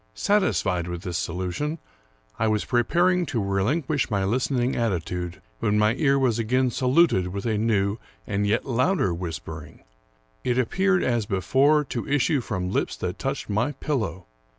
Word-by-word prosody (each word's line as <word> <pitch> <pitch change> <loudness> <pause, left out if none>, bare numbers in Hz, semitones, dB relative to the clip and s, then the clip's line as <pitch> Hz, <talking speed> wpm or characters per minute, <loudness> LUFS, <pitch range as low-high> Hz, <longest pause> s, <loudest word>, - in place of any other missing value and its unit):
Satisfied 185 - +1
with 85 0 -5
this 90 -1 -2
solution, 90 - -3 0.6
I 110 - +2
was 105 -1 0
pre 120 -1 +2
paring 180 +8 +2
to 120 - -1
relinquish 125 - 0
my 100 -3 0
listening 125 +4 0
attitude, 90 -5 -2 0.2
when 105 0 +1
my 105 +1 +3
ear 135 +1 +2
was 125 -4 +1
again 125 +3 +1
saluted 130 - +3
with 100 +2 -5
a 110 -2 +1
new 105 -1 +1 0.3
and 100 0 -1
yet 110 +3 +1
louder 130 - +1
whispering. 80 -3 -7 0.6
It 125 -1 0
appeared, 185 +9 +2
as 120 -4 0
before, 135 - +3
to 125 -3 -5
issue 145 0 +2
from 95 -5 -3
lips - - -1
that - - -4
touched - - -3
my 115 +8 0
pillow. 110 - -3
115 Hz, 155 wpm, -25 LUFS, 95-135 Hz, 0.6 s, my